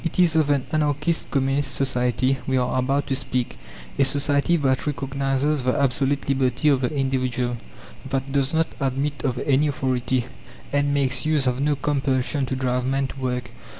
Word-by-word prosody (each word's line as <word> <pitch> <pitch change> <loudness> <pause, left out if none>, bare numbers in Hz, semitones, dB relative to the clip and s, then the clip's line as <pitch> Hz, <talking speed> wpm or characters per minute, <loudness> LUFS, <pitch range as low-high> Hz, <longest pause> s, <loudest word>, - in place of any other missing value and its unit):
It 165 - -3
is 175 -3 +4
of 155 -2 +3
an 140 -3 +2
Anarchist 150 +1 0
Communist 135 +1 0
society 130 0 +1
we 130 -1 +2
are 125 0 +1
about 135 +2 +1
to 135 - -1
speak, 130 -2 -2 0.4
a - - +6
society 140 +4 +2
that 135 -2 0
recognizes 140 +1 0
the 125 +1 0
absolute 140 +1 +1
liberty 135 +2 +2
of 135 -3 +3
the 125 - +1
individual, 130 -4 -1 0.5
that 135 0 -2
does 135 -1 +1
not 160 0 +2
admit 140 +1 -1
of 130 -3 0
any 145 +2 +3
authority, 130 -3 0 0.5
and 145 0 +2
makes 135 -2 +1
use 150 -3 +2
of 125 +1 0
no 145 0 +2
compulsion 135 -1 0
to 130 - -2
drive 125 -1 0
men 135 +1 0
to 135 - -9
work. 125 -1 -3
135 Hz, 175 wpm, -23 LUFS, 130-145 Hz, 0.5 s, a